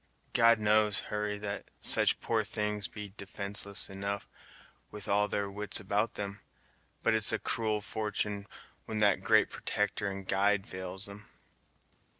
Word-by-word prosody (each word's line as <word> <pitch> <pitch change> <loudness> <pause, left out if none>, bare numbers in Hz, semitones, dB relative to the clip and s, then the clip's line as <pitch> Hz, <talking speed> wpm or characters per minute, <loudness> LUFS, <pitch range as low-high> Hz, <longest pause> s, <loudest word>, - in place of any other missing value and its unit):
God 115 0 +6
knows, 105 -1 +3
Hurry, 105 0 -1
that 100 0 -5
such - - +4
poor 110 -2 +1
things 105 -2 -2
be 105 -2 -8
defenceless 100 +1 -2
enough 100 0 -4 0.6
with 105 -1 -8
all 105 +1 +3
their 100 -1 -1
wits 105 +1 -3
about 105 +2 0
'em; 100 0 -4 0.6
but - - +4
it's 110 -1 +6
a 110 - +2
cruel 110 -1 -1
fortun' 105 -1 -2 0.4
when 110 - -4
that 100 -2 +4
great - - +4
protector 105 0 -1
and 95 -1 -6
guide 100 0 +2
fails 95 +2 -4
'em." 105 +1 -11
105 Hz, 145 wpm, -31 LUFS, 100-105 Hz, 0.6 s, God